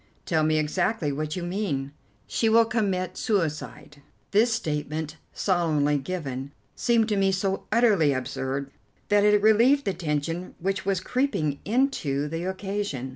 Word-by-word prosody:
"Tell 160 Hz, -2 st, +1 dB
me 155 Hz, 0 st, +2 dB
exactly 160 Hz, +2 st, 0 dB
what 155 Hz, +2 st, -3 dB
you 180 Hz, -, -4 dB
mean." 175 Hz, -7 st, -2 dB, 0.3 s
"She 225 Hz, -, +1 dB
will 230 Hz, +1 st, +6 dB
commit 195 Hz, -5 st, -1 dB
suicide." 155 Hz, -7 st, -2 dB, 0.3 s
This 225 Hz, +4 st, +4 dB
statement, 155 Hz, -5 st, -3 dB
solemnly 155 Hz, -6 st, +1 dB
given, 140 Hz, -3 st, -5 dB, 0.2 s
seemed 230 Hz, -2 st, +2 dB
to 210 Hz, -, +1 dB
me 195 Hz, -1 st, +3 dB
so 190 Hz, +1 st, -1 dB
utterly 215 Hz, -10 st, +4 dB
absurd 135 Hz, +1 st, -3 dB, 0.4 s
that 205 Hz, 0 st, +4 dB
it 210 Hz, 0 st, +5 dB
relieved 235 Hz, +6 st, +5 dB
the 195 Hz, -, 0 dB
tension 165 Hz, +2 st, -3 dB
which 195 Hz, +1 st, -2 dB
was 195 Hz, -3 st, +1 dB
creeping 190 Hz, -, -1 dB
into 200 Hz, -, 0 dB
the 165 Hz, +3 st, -4 dB
occasion. 190 Hz, -8 st, -3 dB
180 Hz, 140 wpm, -26 LUFS, 150-210 Hz, 0.4 s, will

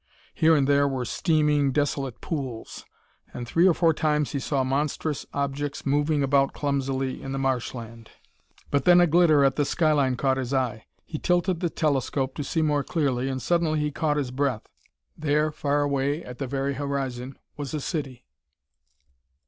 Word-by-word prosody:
Here 160 Hz, -1 st, +4 dB
and 140 Hz, -3 st, +2 dB
there 140 Hz, 0 st, +4 dB
were 130 Hz, -2 st, -2 dB
steaming, 150 Hz, -1 st, +2 dB
desolate 140 Hz, -3 st, -1 dB
pools. 130 Hz, -8 st, -5 dB, 0.5 s
And 120 Hz, -1 st, -5 dB
three 170 Hz, +9 st, +4 dB
or 180 Hz, -, +5 dB
four 165 Hz, -2 st, +3 dB
times 150 Hz, -1 st, 0 dB
he 140 Hz, -, -2 dB
saw 135 Hz, 0 st, 0 dB
monstrous 145 Hz, +2 st, -2 dB
objects 140 Hz, +1 st, -3 dB
moving 145 Hz, +1 st, +1 dB
about 140 Hz, 0 st, +2 dB
clumsily 135 Hz, -2 st, -2 dB
in 135 Hz, -, -5 dB
the -, -, -2 dB
marsh 130 Hz, -2 st, -1 dB
land. 115 Hz, -1 st, -9 dB, 0.6 s
But 140 Hz, -, +1 dB
then 175 Hz, -1 st, +7 dB
a 175 Hz, -, +6 dB
glitter 160 Hz, -3 st, +4 dB
at 135 Hz, -, +1 dB
the 145 Hz, -, +3 dB
skyline 145 Hz, -4 st, +2 dB
caught 130 Hz, +1 st, +1 dB
his 130 Hz, +1 st, -2 dB
eye. 120 Hz, -4 st, -2 dB, 0.2 s
He 155 Hz, -, -6 dB
tilted 175 Hz, 0 st, +1 dB
the 175 Hz, -1 st, 0 dB
telescope 135 Hz, -3 st, -1 dB
to 145 Hz, -, -2 dB
see 160 Hz, +3 st, -1 dB
more 145 Hz, -2 st, +1 dB
clearly, 135 Hz, -6 st, -1 dB
and 130 Hz, -1 st, -2 dB
suddenly 160 Hz, +3 st, +1 dB
he 150 Hz, 0 st, -1 dB
caught 150 Hz, 0 st, 0 dB
his 135 Hz, -4 st, -2 dB
breath. 130 Hz, -4 st, -1 dB, 0.5 s
There, 150 Hz, 0 st, +1 dB
far 145 Hz, -1 st, 0 dB
away 140 Hz, +2 st, 0 dB
at 125 Hz, 0 st, -10 dB
the 135 Hz, -, -3 dB
very 135 Hz, +1 st, -1 dB
horizon, 135 Hz, -2 st, -4 dB, 0.2 s
was 145 Hz, 0 st, -5 dB
a -, -, -1 dB
city. 135 Hz, -5 st, -4 dB
140 Hz, 175 wpm, -25 LUFS, 135-150 Hz, 0.6 s, then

